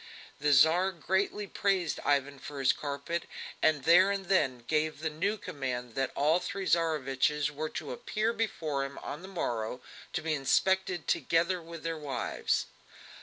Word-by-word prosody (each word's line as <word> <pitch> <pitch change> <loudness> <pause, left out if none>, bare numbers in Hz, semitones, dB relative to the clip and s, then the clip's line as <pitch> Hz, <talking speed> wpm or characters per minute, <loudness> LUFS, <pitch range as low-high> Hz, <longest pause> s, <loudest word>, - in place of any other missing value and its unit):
The 150 +1 +2
Tsar 160 +8 +5
greatly 190 +4 -1
praised 190 -4 0
Ivan 140 -1 +1
for 145 - -8
his 135 -1 +4
carpet, 150 +4 -3 0.4
and 150 -4 +3
there 175 +5 +6
and 200 -1 -2
then 130 -10 +2
gave 155 +2 0
the 160 0 -1
new 200 +8 -1
command 125 - -4
that 135 +2 0
all 155 +5 +3
three 195 +1 -4
Tsareviches 150 -3 +1
were 155 +2 -4
to - - -5
appear 215 - -1
before 160 -11 -1
him 135 0 -6
on 150 - -5
the 190 - -9
morrow 120 - -3 0.3
to 160 - -2
be 160 -1 0
inspected 180 +5 +1
together 170 +2 +1
with 165 0 -10
their 165 -1 -3
wives. 145 -3 -1
155 Hz, 160 wpm, -30 LUFS, 140-185 Hz, 0.4 s, there